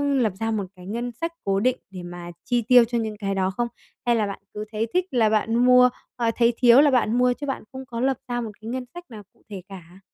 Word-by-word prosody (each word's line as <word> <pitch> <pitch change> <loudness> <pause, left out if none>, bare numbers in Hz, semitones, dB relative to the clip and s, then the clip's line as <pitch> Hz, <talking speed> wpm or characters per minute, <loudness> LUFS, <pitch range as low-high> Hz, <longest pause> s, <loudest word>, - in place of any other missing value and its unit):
lập 230 -7 +1
ra 225 0 -1
một 210 -3 -1
cái 180 -1 -13
ngân 235 +4 -3
sách 330 +8 -4
cố 195 0 +1
định 255 +4 +1
để 185 -2 -9
mà 175 0 -8
chi 245 -1 +1
tiêu 245 +2 +6
cho 235 +1 -2
những 220 -2 -3
cái 195 -2 -2
đó 190 -1 +1
không? 240 0 0 0.4
Hay 240 -1 +3
là 215 -2 +1
bạn 200 - -6
cứ 210 0 -5
thấy 220 +1 -1
thích 365 0 +2
là 230 -4 +3
bạn 220 +1 +1
mua, 250 +1 +6 0.3
ờ, 230 -2 0
thấy 235 0 +3
thiếu 245 +1 +7
là 290 -1 +4
bạn 240 -2 +2
mua 250 0 +3
chứ 285 +3 -7
bạn 270 - -3
không 265 0 -8
có 235 -2 -6
lập 265 +1 +1
ra 240 -1 -2
một 225 -2 -5
cái 220 - -7
ngân 255 +1 -4
sách 350 - -8
nào 215 -2 -9
cụ - - -31
thể 200 -3 -7
cả? 180 -1 -12
235 Hz, 270 wpm, -24 LUFS, 210-250 Hz, 0.4 s, thiếu